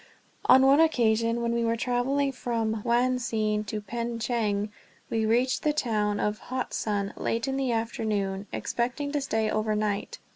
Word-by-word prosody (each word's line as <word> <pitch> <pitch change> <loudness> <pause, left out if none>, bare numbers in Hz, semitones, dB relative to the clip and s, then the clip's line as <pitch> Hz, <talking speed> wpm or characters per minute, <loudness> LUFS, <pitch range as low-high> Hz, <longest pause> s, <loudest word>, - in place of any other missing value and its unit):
On 260 +1 +7
one 275 +2 +6
occasion, 230 -6 +2
when 235 - 0
we 235 0 0
were 230 0 +1
traveling 255 +4 0
from 225 -4 -2
Wuanhsien 235 -3 +1
to 210 +1 -3
Pengcheng, 225 -2 -2 0.4
we 220 -1 +1
reached 245 +3 +2
the 300 - +1
town 210 -7 0
of 210 0 -1
Hotsun 210 -5 -2
late 230 +4 -1
in 270 - -1
the 270 -2 0
afternoon, 210 -3 -2
expecting 250 +4 -2
to 290 -1 0
stay 220 -5 0
over 215 0 0
night. 210 -1 -2
230 Hz, 150 wpm, -27 LUFS, 215-250 Hz, 0.4 s, On